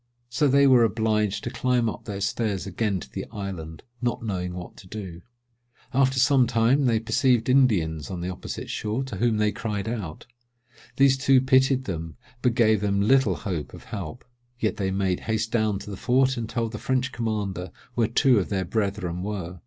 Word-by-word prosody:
So 130 +5 +2
they 140 +1 +5
were 130 -3 +6
obliged 110 -2 +1
to 120 - -4
climb 125 -2 +1
up 110 - -5
their 100 -2 -5
stairs 100 -1 -1
again 100 0 -1
to - - -10
the - - -5
island, 95 -7 -6 0.2
not 120 -1 -1
knowing 90 -4 -3
what 90 -1 -8
to 95 - -13
do. 95 -4 -7 0.7
After 130 0 +3
some 130 -1 +4
time 120 +4 +3
they 115 -3 +3
perceived 120 +1 +2
Indians 90 - +2
on 90 - -4
the 90 +1 -3
opposite 90 - -6
shore, 110 +5 -2
to 130 -7 -6
whom 115 +1 +2
they 105 0 +2
cried 105 -2 -4
out. 105 -9 -5 0.7
These 135 -1 +4
two 135 -1 +5
pitied 130 0 +3
them, 80 -6 -5 0.3
but 125 -2 +2
gave 110 -4 +4
them 100 -1 +1
little 130 +6 +3
hopes 90 -9 -5
of - - -12
help; 100 +3 -7 0.3
yet 110 - 0
they 95 -2 -1
made 95 -1 0
haste 110 0 -2
down 110 -3 +1
to 100 - -8
the 100 - -6
fort, 130 +3 +2
and 115 -2 -4
told 115 -1 -2
the 110 - -6
French 130 0 0
commander 105 -7 -3 0.2
where 115 -2 +2
two 120 0 +4
of 95 - -3
their 95 -2 -1
brethren 100 -3 -2
were. 95 -3 -5
110 Hz, 190 wpm, -25 LUFS, 95-125 Hz, 0.7 s, were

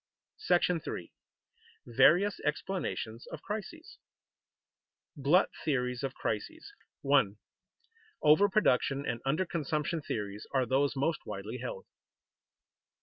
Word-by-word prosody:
§ 175 -2 +2
III. - - -11 0.7
VARIOUS 200 +3 +4
EXPLANATIONS 150 -8 -3
OF - - -8
CRISES 215 +11 -7 1.2
[Sidenote: 140 - -11
Glut 175 +8 +5
theories 125 -5 0
of 135 -1 -3
crises] 320 - -4 0.3
1. 135 -8 +3 0.9
_Over 175 +7 +6
production 140 -8 +2
and 120 0 -3
under 155 +7 +1
consumption 155 -1 -2
theories 105 -5 -5
are 130 -1 +3
those 135 +3 +1
most 145 +4 0
widely 105 +4 -5
held. 115 -6 -6
145 Hz, 105 wpm, -31 LUFS, 125-180 Hz, 1.2 s, Over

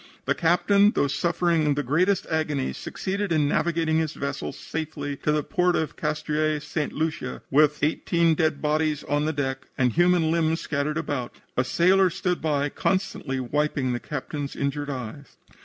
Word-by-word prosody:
"The - - +2
captain, 200 +5 +3
though 140 - +2
suffering 165 0 +1
the 145 - -1
greatest 180 +9 +2
agony, 150 -4 -1
succeeded 195 0 -3
in 155 -3 +3
navigating 160 +1 +1
his 160 -1 -1
vessel 140 -1 -3
safely 150 -3 -5
to 150 - 0
the 150 -1 +1
port 180 +3 +1
of 160 - -1
Castries, 155 0 -1
St. 150 0 -2
Lucia, 160 +1 -3
with 150 +1 +3
eighteen 165 +2 +2
dead 155 -2 0
bodies 150 0 +1
on 145 +2 0
the 155 - +1
deck 135 -2 -3
and 125 -4 +2
human 175 -1 +3
limbs 165 0 +1
scattered 150 +1 -2
about. 145 -6 -3 0.2
A 125 - +2
sailor 185 +7 +4
stood 180 0 -2
by 145 -2 +1
constantly 170 -7 -1
wiping 140 0 0
the 120 - -2
captain's 145 0 -5
injured 140 +1 -2
eyes. 130 +1 -7
155 Hz, 160 wpm, -25 LUFS, 145-165 Hz, 0.2 s, sailor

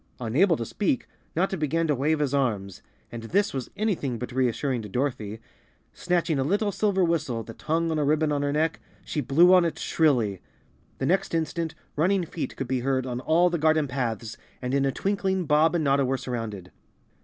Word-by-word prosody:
Unable 145 - +2
to 115 - -3
speak, 220 - -1 0.3
Notta 190 +3 +1
began 165 0 0
to 150 - +2
wave 145 +4 +1
his 145 -2 -1
arms, 105 -9 -1 0.3
and 120 - -6
this 195 - 0
was 130 -3 -4
anything 175 - -1
but 125 +2 -6
reassuring 130 0 0
to 105 - -8
Dorothy. 110 -3 -2 0.5
Snatching 175 -4 0
a - - +2
little 205 +7 +1
silver 195 -1 +1
whistle 155 -9 0
that 115 - -12
hung 165 +1 0
on 155 - 0
a - - +2
ribbon 150 +1 +2
on 145 -1 0
her 145 0 0
neck, 155 +2 0 0.3
she 150 - -2
blew 165 +8 +5
on 180 -1 +6
it 170 - -1
shrilly. 120 - +1 0.6
The 135 - -2
next 185 +2 +1
instant 165 0 -2 0.2
running 180 +4 +2
feet 165 - -5
could 135 - -4
be 130 0 0
heard 130 0 0
on 125 -1 -3
all 170 +6 +3
the 170 - -1
garden 155 -1 +3
paths 115 -4 -3 0.2
and 125 0 -3
in 140 0 +2
a 135 - +1
twinkling 190 +2 -1
Bob 155 +3 +3
and 165 - +1
Notta 140 -1 +3
were 135 +1 0
surrounded. 110 -8 -5
145 Hz, 200 wpm, -26 LUFS, 125-170 Hz, 0.6 s, on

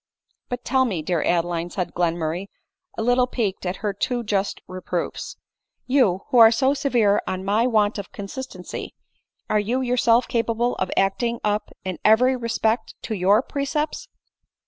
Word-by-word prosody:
" - - -49
But 245 0 -5
tell 260 0 +3
me, 185 -10 -2
dear 170 0 0
Adeline," 170 0 0
said 180 -1 -4
Glenmurray, 170 +1 -1 0.5
a 220 - -1
little 245 +1 +3
piqued 205 -7 -2
at 180 - -2
her 205 - 0
too 240 +4 -2
just 205 -2 -1
reproofs, 185 -1 -4 0.2
" - - -56
you, 195 -9 +3
who 250 - +5
are 225 -1 +10
so 265 +4 +2
severe 240 -8 +2
on 185 0 -3
my 215 +5 +2
want 215 -3 +2
of 200 - -8
consistency, 200 -2 -7 0.5
are 215 - +2
you 235 +6 -1
yourself 245 -1 +3
capable 230 +1 0
of 185 - -1
acting 235 +5 +1
up 210 0 0 0.2
in 185 -3 -4
every 250 +5 +5
respect 230 -1 -1
to 225 - -3
your 200 +4 +3
precepts 295 - -3
215 Hz, 165 wpm, -23 LUFS, 185-245 Hz, 0.5 s, are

